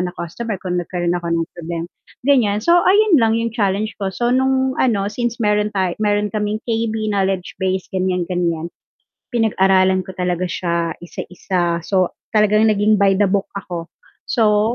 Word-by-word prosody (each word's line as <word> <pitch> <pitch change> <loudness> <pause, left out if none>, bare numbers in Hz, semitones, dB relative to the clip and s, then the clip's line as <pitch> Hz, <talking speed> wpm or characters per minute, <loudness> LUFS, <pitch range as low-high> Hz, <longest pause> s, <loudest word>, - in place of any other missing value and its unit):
na 180 - -1
customer, 205 +5 -4
kung 180 -1 -1
nagkaroon 175 0 -2
ako 175 -1 -3
ng 165 0 +1
problema 170 -1 -5 0.4
ganiyan, 245 -7 +3
so, 340 - +4 0.2
ayun 400 -5 +5
lang 225 0 +3
yung 230 0 -1
challenge 210 -1 0
ko, 195 - -1
so, 240 +5 -1
nung 265 0 +2
ano 215 -6 +2
since 240 0 -2
meron 210 -2 +1
tay 185 -2 +1
meron 205 0 +1
kaming 210 0 -1
KB, 225 -2 -1
knowledge 190 -2 -1
base 190 0 0
ganiyan-ganiyan, 180 -3 -1 0.6
pinag-aralan 190 -4 +3
ko 190 - -8
talaga 180 0 -1
siya, 170 -1 -2
isa-isa, 175 -1 -3
so, 185 -1 0 0.2
talagang 215 0 +4
naging 210 +1 +3
by 195 -1 +3
the 205 - +4
book 195 +1 0
ako, 175 -3 -7 0.4
so, 215 0 +2
195 Hz, 160 wpm, -19 LUFS, 180-220 Hz, 0.6 s, ayun